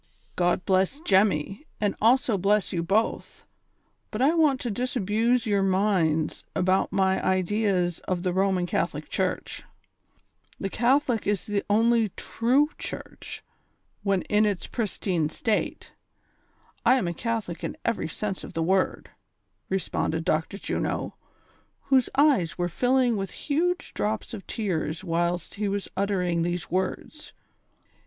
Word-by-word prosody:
"■ -, -, -44 dB, 0.3 s
God 175 Hz, 0 st, +1 dB
bless 190 Hz, +8 st, +2 dB
Jemmy, 195 Hz, -, +1 dB
and 205 Hz, -2 st, +1 dB
also 235 Hz, 0 st, +4 dB
bless 200 Hz, +1 st, +1 dB
you 170 Hz, -, 0 dB
both; 200 Hz, +6 st, -1 dB, 0.6 s
but 215 Hz, -, -5 dB
I 275 Hz, +5 st, +4 dB
want 305 Hz, -6 st, +3 dB
to 240 Hz, -, -2 dB
disabuse 235 Hz, +1 st, +1 dB
your 205 Hz, -3 st, +2 dB
minds 185 Hz, -5 st, +1 dB
about 185 Hz, +1 st, +2 dB
my 190 Hz, -1 st, +2 dB
ideas 185 Hz, -2 st, +1 dB
of 180 Hz, -1 st, -1 dB
the 180 Hz, -2 st, 0 dB
Roman 190 Hz, -1 st, +2 dB
Catholic -, -, -2 dB
Church; -, -, -2 dB, 1.0 s
the 195 Hz, -, -3 dB
Catholic 245 Hz, -2 st, +2 dB
is 205 Hz, -1 st, 0 dB
the 205 Hz, -1 st, -1 dB
only 225 Hz, +1 st, +3 dB
true 260 Hz, +6 st, +2 dB
Church, -, -, -7 dB, 0.6 s
when 195 Hz, -2 st, +1 dB
in 210 Hz, +1 st, +2 dB
its 205 Hz, -4 st, 0 dB
pristine 185 Hz, -8 st, -1 dB
state; 215 Hz, +6 st, -2 dB, 0.9 s
I 245 Hz, +2 st, +6 dB
am 245 Hz, -9 st, 0 dB
a 170 Hz, -, -1 dB
Catholic 220 Hz, -5 st, -3 dB
in -, -, -4 dB
every 230 Hz, -7 st, 0 dB
sense 195 Hz, +3 st, -4 dB
of -, -, -9 dB
the 165 Hz, -, -1 dB
word," 190 Hz, +3 st, 0 dB, 0.6 s
responded 165 Hz, -3 st, -1 dB
Dr. 160 Hz, +6 st, 0 dB
Juno, -, -, -2 dB, 0.8 s
whose 260 Hz, -2 st, +4 dB
eyes 265 Hz, -, +3 dB
were 175 Hz, 0 st, 0 dB
filling 245 Hz, +4 st, +2 dB
with 195 Hz, -1 st, -3 dB
huge 345 Hz, +5 st, -1 dB
drops 215 Hz, +3 st, -2 dB
of 200 Hz, -4 st, -8 dB
tears 170 Hz, -6 st, -2 dB
whilst 175 Hz, 0 st, -1 dB
he 210 Hz, 0 st, -2 dB
was 200 Hz, 0 st, -2 dB
uttering 185 Hz, -3 st, 0 dB
these 175 Hz, +1 st, -2 dB
words. 190 Hz, -, -3 dB
200 Hz, 135 wpm, -26 LUFS, 180-230 Hz, 1.0 s, I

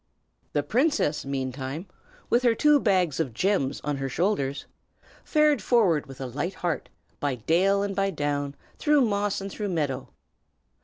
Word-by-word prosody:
The 145 Hz, -, +1 dB
princess, 250 Hz, -, +1 dB
meantime, 135 Hz, +4 st, -3 dB, 0.4 s
with 240 Hz, -, +3 dB
her 240 Hz, -2 st, +3 dB
two 300 Hz, +3 st, +5 dB
bags 185 Hz, -, +2 dB
of 135 Hz, -9 st, -2 dB
gems 180 Hz, -, +1 dB
on 145 Hz, -1 st, -1 dB
her 135 Hz, 0 st, -3 dB
shoulders, 140 Hz, -3 st, -1 dB, 0.6 s
fared 300 Hz, -2 st, +3 dB
forward 185 Hz, -, +3 dB
with 135 Hz, -1 st, -11 dB
a 135 Hz, -, -4 dB
light 145 Hz, +9 st, -3 dB
heart, 175 Hz, -3 st, -2 dB, 0.3 s
by 145 Hz, -3 st, 0 dB
dale 185 Hz, -, +2 dB
and 200 Hz, -1 st, -3 dB
by 195 Hz, 0 st, +1 dB
down, 145 Hz, -4 st, -2 dB, 0.2 s
through 295 Hz, -2 st, +4 dB
moss 205 Hz, -4 st, 0 dB
and 195 Hz, 0 st, -5 dB
through 205 Hz, 0 st, -3 dB
meadow. 145 Hz, -7 st, -2 dB
170 Hz, 155 wpm, -26 LUFS, 140-205 Hz, 0.6 s, two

